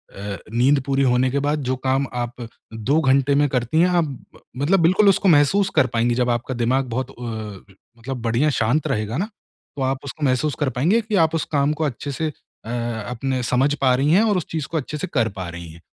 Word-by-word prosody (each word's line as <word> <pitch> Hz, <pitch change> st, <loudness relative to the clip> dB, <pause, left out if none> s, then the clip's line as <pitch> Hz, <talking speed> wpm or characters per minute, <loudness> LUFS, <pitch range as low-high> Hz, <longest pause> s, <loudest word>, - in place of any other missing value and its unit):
अ, 100 Hz, 0 st, -5 dB, 0.2 s
नींद 130 Hz, +5 st, +3 dB
पूरी 135 Hz, 0 st, +1 dB
होने 125 Hz, 0 st, +3 dB
के 140 Hz, -, 0 dB
बाद 150 Hz, +1 st, 0 dB
जो 130 Hz, -, +1 dB
काम 135 Hz, +1 st, +2 dB
आप 120 Hz, 0 st, -4 dB, 0.3 s
2 125 Hz, +8 st, +1 dB
घंटे 135 Hz, 0 st, +3 dB
में 145 Hz, +1 st, +3 dB
करती 125 Hz, +4 st, 0 dB
हैं 180 Hz, -, +5 dB
आप 175 Hz, -1 st, +2 dB
ब 140 Hz, -4 st, -11 dB, 0.2 s
मतलब 160 Hz, +9 st, +2 dB
बिल्कुल 185 Hz, +5 st, +5 dB
उसको 195 Hz, 0 st, +3 dB
महसूस 175 Hz, +6 st, +4 dB
कर 130 Hz, -, +4 dB
पाएँगी 120 Hz, +1 st, +2 dB
जब 125 Hz, 0 st, +1 dB
आपका 120 Hz, +2 st, -1 dB
दिमाग 125 Hz, +3 st, +1 dB
बहुत 130 Hz, +2 st, -3 dB
अ, 110 Hz, -6 st, -8 dB, 0.3 s
मतलब 125 Hz, +1 st, -5 dB
बढ़िया 120 Hz, +6 st, +1 dB
शांत 120 Hz, +7 st, +1 dB
रहेगा 110 Hz, +3 st, -2 dB
ना, 200 Hz, +6 st, -2 dB, 0.5 s
तो 140 Hz, -, -5 dB
आप 135 Hz, +1 st, 0 dB
उसको 145 Hz, +2 st, -7 dB
महसूस 130 Hz, +2 st, +1 dB
कर 145 Hz, -3 st, +1 dB
पाएँगी 165 Hz, -, +2 dB
कि 215 Hz, -1 st, -3 dB
आप 160 Hz, 0 st, 0 dB
उस 165 Hz, -, 0 dB
काम 140 Hz, +1 st, +2 dB
को -, -, +1 dB
अच्छे 140 Hz, +1 st, -4 dB
से 160 Hz, +4 st, -2 dB
अ, 145 Hz, -6 st, -12 dB, 0.4 s
अपने 130 Hz, +2 st, -2 dB
समझ 130 Hz, +4 st, +2 dB
पा 130 Hz, -2 st, +4 dB
रही 140 Hz, +4 st, +1 dB
हैं 195 Hz, +6 st, +5 dB
और 210 Hz, -4 st, +2 dB
उस 175 Hz, -, -2 dB
चीज़ 155 Hz, -4 st, -3 dB
को 165 Hz, -, -3 dB
अच्छे 150 Hz, +1 st, -4 dB
से -, -, -4 dB
कर 115 Hz, -5 st, +2 dB
पा 95 Hz, -2 st, -4 dB
रही 85 Hz, 0 st, -8 dB
हैं। 85 Hz, +1 st, -15 dB
135 Hz, 230 wpm, -21 LUFS, 120-150 Hz, 0.5 s, हैं